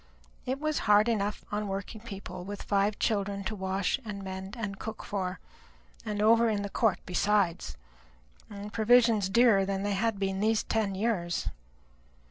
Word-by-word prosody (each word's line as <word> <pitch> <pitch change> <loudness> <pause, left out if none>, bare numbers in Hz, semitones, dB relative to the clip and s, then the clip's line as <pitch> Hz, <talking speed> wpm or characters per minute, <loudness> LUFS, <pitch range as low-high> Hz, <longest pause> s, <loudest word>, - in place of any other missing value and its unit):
It 260 +2 -1
was 310 0 0
hard 210 +2 +6
enough 210 -3 -1
upon 210 0 -3
working 200 +2 -5
people 195 -5 -7
with 200 +2 -6
five 200 +1 +1
children 200 -2 -1
to 190 - -3
wash 190 +4 -1
and 205 -3 -6
mend 190 +2 -6
and 205 -4 -4
cook 220 0 -6
for, 185 -3 -3 0.6
and 210 0 -2
over 230 +1 +5
in 205 -2 -1
the 200 - -5
court 225 -1 +2
besides, 180 - +1 0.7
and 205 0 -8
provisions 230 -3 +4
dearer 225 -2 +5
than 195 0 -2
they 205 0 0
had 220 +2 0
been 195 -1 -1
these 220 +1 +2
ten 210 -3 -1
years. 190 -5 -1
205 Hz, 160 wpm, -29 LUFS, 195-220 Hz, 0.7 s, hard